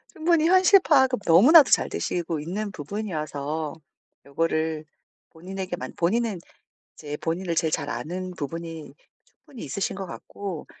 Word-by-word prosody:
충분히 325 0 +2
현실 375 +2 +6
파악은 265 - +3
너무나도 255 - +8
잘 - - +3
되시고 170 -3 -3
있는 195 +7 -4
부분이어서 155 -4 -4 0.5
요거를 155 +1 -1 0.5
본인에게만 185 +1 -6
본인은 205 +2 0 0.6
이제 150 -1 -6
본인을 170 +1 -2
제일 160 -2 +1
잘 145 -1 -2
아는 185 +5 -4
부분이 165 +1 -6 0.3
충분히 255 - -14
있으신 195 -1 -3
것 195 -1 -5
같고 185 -1 -7
175 Hz, 310 characters per minute, -25 LUFS, 160-215 Hz, 0.6 s, 너무나도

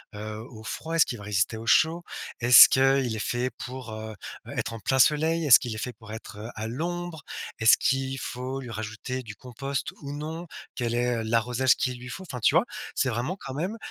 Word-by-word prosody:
heu, 105 +1 -6
au 110 -2 -12
froid? 160 +8 -4
Est-ce 165 - +6
qu'il 120 - -5
va - - -10
résister 100 +1 0
au 115 +1 -8
chaud? 160 +8 +4 0.4
Est-ce 120 +1 +10
qu'il 135 -3 +3
est - - -4
fait 120 +3 -1
pour, 125 -2 -7
heu, 110 0 -7 0.4
être 115 - -2
en 115 - -6
plein 130 +5 0
soleil? 160 +4 +3
Est-ce 135 -5 +9
qu'il 120 -3 -5
est - - -6
fait 125 +2 -4
pour 110 -1 -12
être, 110 -2 -9
heu, 110 +2 -7
à 110 - -4
l'ombre? 170 +5 -4 0.4
Est-ce 110 -1 +7
qu'il 135 0 0
faut 130 +2 -4
lui 125 -3 -8
rajouter 110 +4 -5
du 110 -3 -9
compost 135 +4 -4
ou 140 0 -6
non? 160 +4 -6 0.3
Quelle 120 -2 -1
est, 120 0 +1
heu, - - -2
l'arrosage 120 +3 +2
qu'il 125 -1 -2
lui 125 - -9
faut? 190 - -7
Enfin, 130 -9 -7
tu - - +4
vois? - - +5 0.3
C'est 130 - +1
vraiment 125 +9 -2
quand 135 - -8
même, 180 +10 -3
125 Hz, 220 wpm, -26 LUFS, 115-140 Hz, 0.4 s, Est-ce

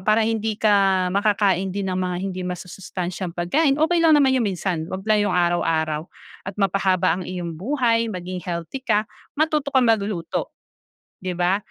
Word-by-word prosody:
para 215 +1 +4
hindi 220 -1 -1
ka 195 -3 +3
makakain 200 -2 +2
din 195 0 -3
ng 185 - -1
mga 180 -1 -1
hindi 185 -1 -4
masusustansyang 180 0 -5
pagkain," 275 - +2
okey 335 +2 +3
lang 320 -2 +6
naman 265 -2 +4
yung 250 - +2
minsan 175 -3 -2
'wag 190 +1 -5
lang 215 -1 +3
yung - - 0
araw-araw 160 -3 +1 0.4
at 190 - -6
mapahaba 190 -3 +2
ang - - -6
iyong 175 -3 -4
buhay, 230 - +1
maging 180 -2 -5
healthy 175 +9 -5
ka, 215 -3 +1 0.3
matuto 305 -2 +1
kang 260 -2 +3
maguluto, 200 -6 -1 0.7
di 185 -1 -4
ba? 180 +2 +2
195 Hz, 165 wpm, -22 LUFS, 180-225 Hz, 0.7 s, lang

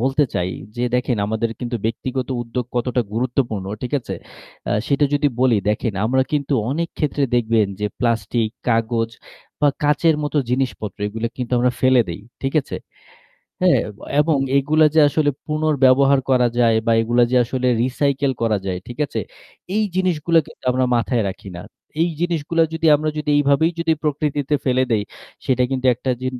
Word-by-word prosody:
বলতে 135 +4 +2
চাই, 90 -1 0 0.3
যে 120 - 0
দেখেন 125 -1 +1
আমাদের 110 +2 -1
কিন্তু 120 -1 -2
ব্যক্তিগত 130 +3 -2
উদ্যোগ 120 +1 -4
কতটা 125 +1 0
গুরুত্বপূর্ণ। 115 -4 -1 0.2
ঠিক 125 - -4
আছে? - - -6 0.6
আ - - +2
সেটা 140 +1 +2
যদি 145 0 +2
বলি 125 -4 +4
দেখেন 110 +1 0
আমরা 130 +2 +2
কিন্তু 145 -1 0 0.2
অনেক 165 +3 -1
ক্ষেত্রে 150 -1 0
দেখবেন 115 -3 +2
যে 105 - +1
প্লাস্টিক, 115 -1 0 0.2
কাগজ 115 0 0 0.5
বা 145 - +5
কাঁচের 150 +2 +3
মতো 150 +1 -3
জিনিসপত্র 120 -6 -2
এগুলো 115 +2 -3
কিন্তু 125 -1 -5
আমরা 125 +1 +3
ফেলে 130 -1 +5
দেই। 85 +3 -5 0.2
ঠিক 135 - -1
আছে? - - -6 0.8
হ্যাঁ 180 -1 +5 0.4
এবং 150 -2 +2 0.2
এগুলা 155 +3 +4
যে 160 - +6
আসলে 145 +1 +1 0.2
পুনর্ব্যবহার 140 -3 +3
করা 125 -2 +4
যায় 115 -2 +4
বা 115 - +3
এগুলা 120 +2 +3
যে 130 - +2
আসলে 125 +1 -2 0.2
recycle 135 +1 0
করা 110 -3 +2
যায়, 90 -1 -2
ঠিক 120 - -9
আছে? - - -4 0.6
এই 215 - +2
জিনিসগুলো 170 -3 +2
কিন্তু - - -16
আমরা 130 +1 +1
মাথায় 120 0 0
রাখি 95 +1 -8
না। 90 - -7 0.4
এই 170 - +1
জিনিসগুলা 165 -1 0
যদি 165 0 0
আমরা 155 +1 -2
যদি 150 0 -2
এইভাবেই 145 +3 +3
যদি 165 -1 +2
প্রকৃতিতে 150 -1 -1
ফেলে 130 -1 +2
দেই 105 -2 +2 0.4
সেটা 125 -1 +1
কিন্তু 130 -1 -1
একটা 125 +2 -3
জি 130 - -3
130 Hz, 170 wpm, -20 LUFS, 115-145 Hz, 0.8 s, যে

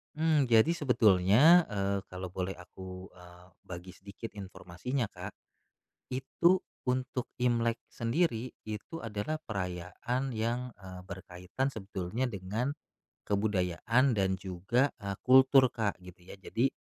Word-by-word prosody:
Mmm, 155 -3 +3
jadi 115 +7 +5
sebetulnya, 125 - +5
eee, 100 -1 -1
kalau 90 -1 -7
boleh 95 +1 -3
aku, 90 +1 -10
eee, 90 0 -15 0.2
bagi 90 +1 -8
sedikit 100 +4 -9
informasinya, 100 +5 -4
Kak, - - -8 0.8
itu 150 +8 +2 0.2
untuk 130 0 -2
Imlek 120 -2 +1
sendiri 120 -1 0 0.2
itu 110 +9 -6
adalah 115 +6 -3
perayaan 110 - -3
yang, 120 +3 -2
eee, 95 -2 -10
berkaitan 95 +6 -4
sebetulnya 100 +1 -3
dengan 110 +6 -3 0.5
kebudayaan 105 +5 +2
dan 95 -1 +2
juga, 100 +9 +1
eee, 100 -3 -4
kultur, 130 0 +6
Kak, 110 -4 -1
gitu 90 0 -13
ya, - - -9
jadi, 115 +6 0
110 Hz, 120 wpm, -31 LUFS, 95-130 Hz, 0.8 s, kultur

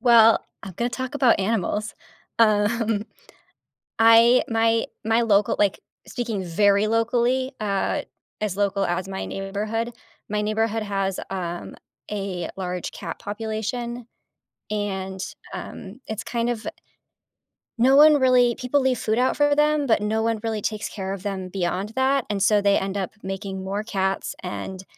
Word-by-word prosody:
Well, 230 -2 +6 0.2
I'm 195 - -8
gonna 240 +4 -1
talk 260 +2 -4
about 260 -5 +4
animals. 210 0 -1 0.4
Um, 215 0 +2 1.0
I 230 +2 +7
my 225 0 +2 0.2
my 225 +1 +3
loca 210 -2 +3
like, 205 -2 +2 0.3
speaking 225 -6 -3
very 200 +4 +3
locally- 240 +3 +1
uh, 200 -2 0 0.4
as 205 -3 -2
local 200 -1 +1
as 180 +2 -2
my 190 0 -4
neighborhood- 210 +4 -3 0.4
my 210 0 0
neighborhood 220 +1 0
has, 195 -2 -2
um, 175 -2 -5 0.4
a 195 -4 -3
large 180 -2 -4
cat - - -7
population, 225 +3 -4 0.6
and, 190 -2 -3 0.3
um, 200 +6 -8
it's 220 0 -4
kind 235 0 -1
of 235 -2 -4 1.1
no 260 +3 +5
one 300 +1 +8
really 250 -2 +4
people 255 +3 0
leave 260 -1 +2
food 220 +1 0
out 255 - +2
for 290 0 +4
them, 300 0 +3
but 225 -5 +2
no 220 +1 0
one 225 -1 0
really 220 -2 -2
takes 215 +1 -3
care 190 -2 -4
of 195 - -6
them 195 -2 -3
beyond 185 +2 -2
that, 265 0 +2
and 205 -2 -1
so, 205 +2 +4
they 200 0 +4
end 195 +1 -2
up 190 -2 -2
making 195 0 -5
more 200 +2 -3
cats 195 -3 -2
and 185 +1 -5
215 Hz, 150 wpm, -24 LUFS, 195-235 Hz, 1.1 s, one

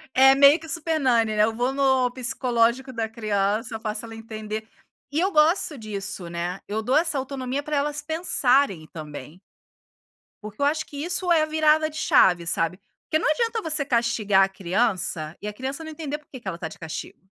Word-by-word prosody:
É 270 +1 +7
meio 280 +3 +7
que 320 0 -11
Super 320 -1 -1
Nanny, 230 -5 +2
né, 210 - +4
eu 225 +1 +1
vou 245 +3 0
no 265 -2 +2
psicológico 250 0 0
da 225 -2 -2
criança, 215 0 -1
eu 225 - -4
faço 215 +1 -4
ela 225 0 -9
entender. 220 -1 -6 0.4
E 295 - 0
eu 380 +3 +1
gosto 310 0 +3
disso, 200 -6 -5
né, 175 +2 -4
eu 215 +2 -3
dou 255 +4 +1
essa 320 -2 +2
autonomia 265 +1 -3
pra 300 0 -2
elas 295 +1 -1
pensarem 275 - +1
também. 150 +1 -9 1.0
Porque 215 +4 -9
eu - - +3
acho 310 +2 0
que 290 - -11
isso 360 +2 -1
é 325 - +5
a - - +2
virada 310 0 +3
de 305 - -14
chave, 175 - +4
sabe. 165 +1 0 0.3
Porque 310 - +1
não 320 - 0
adianta 455 +7 0
você 310 -5 +2
castigar 225 -6 +2
a 195 - +1
criança 180 -4 -1
e 210 - -5
a 210 - -4
criança 265 +7 -5
não 315 - -7
entender 300 -2 -5
porque 295 -2 -13
que 240 - -17
ela 180 -3 -3
tá 170 -2 -5
de 160 - -12
castigo. 160 +3 -8
250 Hz, 200 wpm, -24 LUFS, 210-300 Hz, 1.0 s, É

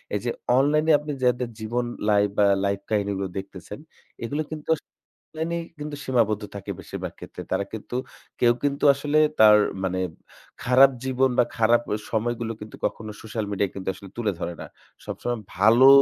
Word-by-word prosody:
এই - - +1
যে 120 - +1 0.3
online 150 +3 +3
এ - - +7
আপনি 150 0 -5
যাদের 125 -1 +2
জীবন 120 +3 -1 0.2
লাইফ 105 -1 +4
বা 105 - +5 0.2
life 100 0 -1
কাহিনীগুলো 100 -2 0
দেখতেছেন 95 +1 -7 0.4
এগুলো 145 +6 -2
কিন্তু 155 -1 -7
য়াস 160 - +2 0.5
online 160 +1 -3
এ - - -2 0.2
কিন্তু 150 0 -5
সীমাবদ্ধ 110 -5 +1
থাকে 100 - -5
বেশিরভাগ - - -6
ক্ষেত্রে। - - -9
তারা 100 - 0
কিন্তু 110 +3 -6 0.4
কেউ 120 -1 +5
কিন্তু 140 0 -1
আসলে 145 +2 +1 0.2
তার 105 -1 +9 0.3
মানে 95 0 -1 0.6
খারাপ 130 +2 +6
জীবন 130 0 +2
বা 120 - +6
খারাপ 115 +1 +4
এ - - -2
সময়গুলো 115 +1 -1
কিন্তু 105 - -9
কখনো 110 -1 -3
social 110 0 -4
media 100 0 +1
কিন্তু 95 -1 -8
আসলে 95 +1 -12
তুলে 110 -4 0
ধরে 85 - -3
না। - - -6 0.4
সবসময় 120 -1 -3 0.2
ভালো 115 +7 +6
115 Hz, 170 wpm, -25 LUFS, 105-130 Hz, 0.6 s, তার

